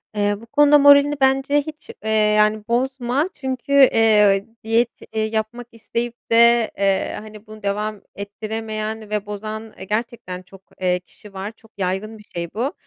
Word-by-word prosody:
Eee, 205 0 +1
bu - - -12
konuda 295 +4 +5
moralini 285 +1 +6
bence 270 +2 +3
hiç, 305 +1 -10
eee, 220 - -3
yani, 215 0 +3
bozma 260 +5 0
çünkü, 265 0 -5
eee, 215 -7 +5 0.2
diyet, 230 +2 +2 0.3
eee, 220 - +1
yapmak 220 +2 -3
isteyip 235 +1 -4 0.2
de, 235 0 +5
eee, 195 -1 0
hani, 215 0 -13
bunu 215 -1 -12
devam 210 +1 -2
ettiremeyen 215 +1 -5
ve 210 -1 -2
bozan, 215 +1 -6
eee, - - -8
gerçekten 210 -4 -4
çok, 190 +1 -16 0.2
eee, 180 -1 +1
kişi 195 +3 -16
var, 195 +3 -5
çok 225 0 -22
yaygın 195 +4 -3
bir 210 - -15
şey 170 -4 -6
bu. 250 +7 -2
220 Hz, 160 wpm, -21 LUFS, 210-240 Hz, 0.3 s, moralini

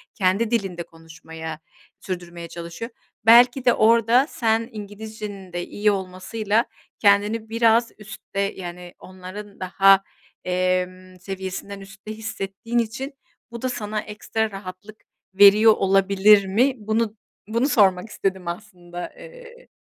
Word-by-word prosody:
kendi 200 +3 +1
dilinde 195 -7 -1
konuşmaya, 160 -1 -10 0.4
sürdürmeye 175 -2 -6
çalışıyor. 170 +8 -7 0.3
Belki 245 +3 +6
de, 245 - +6
orada 230 +4 +4
sen 225 0 0
İngilizcenin 205 -2 -8
de 175 0 -3
iyi 210 0 +1
olmasıyla, 205 +4 -1 0.3
kendini 210 +2 +2
biraz 230 0 +3
üstte, 210 -1 -8
yani 180 -3 -4
onların 185 +2 -10
daha, 195 +1 +4 0.4
emm, 185 0 -2
seviyesinden 190 +1 -6
üstte 195 +2 -11
hissettiğin 220 +1 -4
için, 260 +5 -3 0.4
bu 235 -1 -8
da 255 - -1
sana 215 -3 -3
ekstra 215 +1 -3
rahatlık 195 +2 -10 0.3
veriyor 205 +3 +7
olabilir 195 +1 +4
mi? 245 +8 +2
Bunu 220 0 -1 0.3
bunu 230 +6 0
sormak 195 -3 +3
istedim 190 -3 -3
aslında, 175 -2 -7
eee - - -14
200 Hz, 115 wpm, -23 LUFS, 185-225 Hz, 0.4 s, veriyor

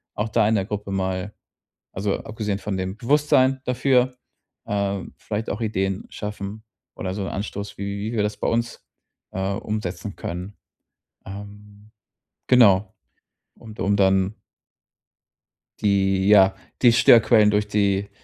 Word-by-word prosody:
auch 105 +2 -2
da 110 -1 +2
in 110 - +2
der 95 -2 0
Gruppe 105 -1 -5
mal, 95 +1 -2 0.6
also 100 +1 -1
abgesehen 105 -2 -4
von 105 -2 -4
dem 95 +1 -4
Bewusstsein 135 +1 +2
dafür, 125 0 +2 0.5
ähm, 100 -2 -2
vielleicht 110 +1 -4
auch 105 - -3
Ideen 95 -3 -1
schaffen 105 0 -6 0.3
oder 95 -2 -4
so 100 - -4
'n - - -4
Anstoß, 100 0 -5
wie 100 - -4
wie 105 +3 -4
wir 110 -3 0
das 105 0 -2
bei - - -3
uns, 115 +1 -2 0.5
äh, 95 +1 -2
umsetzen 100 -3 -4
können. 90 +4 -6 0.7
Ähm, 105 +1 -11 0.6
genau, 105 -6 +5 0.6
und 110 -1 -13
um 100 +1 +2
dann 95 0 +2 1.5
die, 95 -1 +2
ja, 95 -2 +6 0.3
die 120 -2 +6
Störquellen 110 -2 +6
durch 105 0 +1
die 100 -1 0
105 Hz, 135 wpm, -23 LUFS, 95-110 Hz, 1.5 s, ja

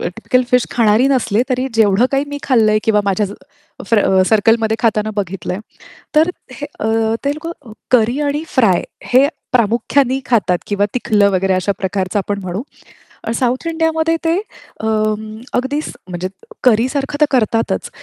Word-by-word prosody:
Typical 225 +7 0
fish 250 -1 +3
खाणारी 230 +2 +3
नसले, 240 -4 +1
तरी 255 +1 0
जेवढं 220 +2 +4
काही 275 +1 +1
मी 285 0 -5
खाल्लंय 220 -5 +3
किंवा 215 -2 +3
माझ्या 200 +1 +1 0.6
फ - - +1 0.3
सर्कलमध्ये 220 +1 +3
खाताना 215 -2 +1
बघितलंय. 185 -2 -3 0.6
तर 320 +3 +5 0.2
हे 290 +3 -6
अ, - - -1 0.4
ते 280 - +2
लोकं 330 +2 -6 0.4
करी 245 +4 +3
आणि 295 +2 -1
फ्राय 220 -9 +2 0.3
हे 270 +3 +6 0.2
प्रामुख्याने 250 +3 +2
खातात 205 -7 +2
किंवा 205 0 +1
तिखलं 210 -5 +2
वगैरे 190 0 +1
अशा 185 +2 0
प्रकारचं 190 +1 -1
आपण 200 +1 -2
म्हणू. 185 +5 -4 0.7
साउथ 255 +6 -1
इंडियामध्ये 325 0 +1
ते 325 +1 +2 0.5
अं, 215 -1 0 0.3
अगदीच 275 +5 -1 0.2
म्हणजे 180 0 -4 0.4
करी 235 -1 +4
सारखं 280 +1 -3
तर - - +7
करतातच. 230 -3 0
225 Hz, 145 wpm, -17 LUFS, 205-265 Hz, 0.7 s, तर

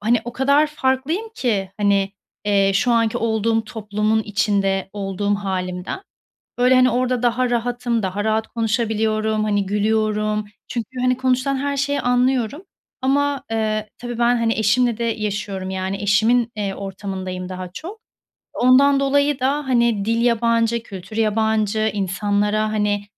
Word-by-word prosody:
hani, 225 +2 +2
o 240 - -6
kadar 280 +4 +3
farklıyım 300 +8 -1
ki, 205 - -1
hani, 200 -1 +2 0.3
eee, 200 -1 +3
şu 240 +4 +2
anki 230 -1 +2
olduğum 225 0 0
toplumun 215 0 -1
içinde 195 -2 0
olduğum 200 0 -1
hâlimden. 185 - -3 0.6
Böyle, 250 +1 +4
hani, 255 0 +5
orada 250 0 0
daha 245 +1 +1
rahatım, 240 -1 -1
daha 200 +2 -2
rahat 220 0 +1
konuşabiliyorum, 220 -1 0
hani, 205 -2 0
gülüyorum 215 +1 0 0.2
çünkü, 235 -1 -4
hani, 255 0 +2
konuşulan 260 +1 +1
her 280 +1 -2
şeyi 285 +1 0
anlıyorum. 250 - +1 0.4
Ama, 280 0 +1
eee, 215 -1 -1
tabii 240 -1 -6
ben, 240 +1 +3
hani, 230 -1 +1
eşimle 230 +2 +2
de 235 - -1
yaşıyorum, 205 -4 -3
yani, 190 +1 -3
eşimin, 225 +4 +3
eee, 200 -2 -2
ortamındayım 190 -2 -5
daha 185 -1 -6
çok. 395 +8 -8 0.5
Ondan 275 +3 +5
dolayı 285 0 +2
da, 275 +2 0
hani, 235 -5 +2
dil 230 +2 +1
yabancı, 230 -1 +2
kültür 200 0 -9
yabancı, 220 0 +1
insanlara, 205 +2 0
hani, 205 -1 0
220 Hz, 140 wpm, -21 LUFS, 205-245 Hz, 0.6 s, hani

